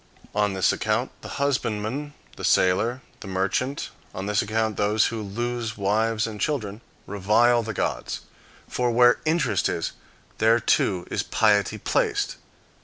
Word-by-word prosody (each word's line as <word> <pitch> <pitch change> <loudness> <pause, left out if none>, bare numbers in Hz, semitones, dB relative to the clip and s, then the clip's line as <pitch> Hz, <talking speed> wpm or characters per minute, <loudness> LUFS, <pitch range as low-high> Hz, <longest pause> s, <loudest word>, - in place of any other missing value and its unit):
On 105 -1 +1
this 95 -1 +3
account - - -1
the - - -7
husbandman, 140 +1 -1 0.2
the - - -9
sailor, 110 +8 +2 0.2
the - - -9
merchant, 100 +9 -1 0.2
on 95 - -4
this 105 -1 +1
account 110 0 -1
those 105 +2 +2
who 115 - -3
lose 115 +2 -3
wives 110 +2 +1
and 110 -2 -6
children, 110 -8 -2 0.2
revile 110 +5 +3
the 110 -2 -5
gods. - - -2 0.5
For 125 -1 0
where 120 +1 +5
interest 155 - +1
is, 85 - -2 0.5
there 115 +2 +4
too 95 -5 +1
is - - 0
piety 105 -2 +2
placed. 425 -4 0
110 Hz, 140 wpm, -25 LUFS, 105-120 Hz, 0.5 s, where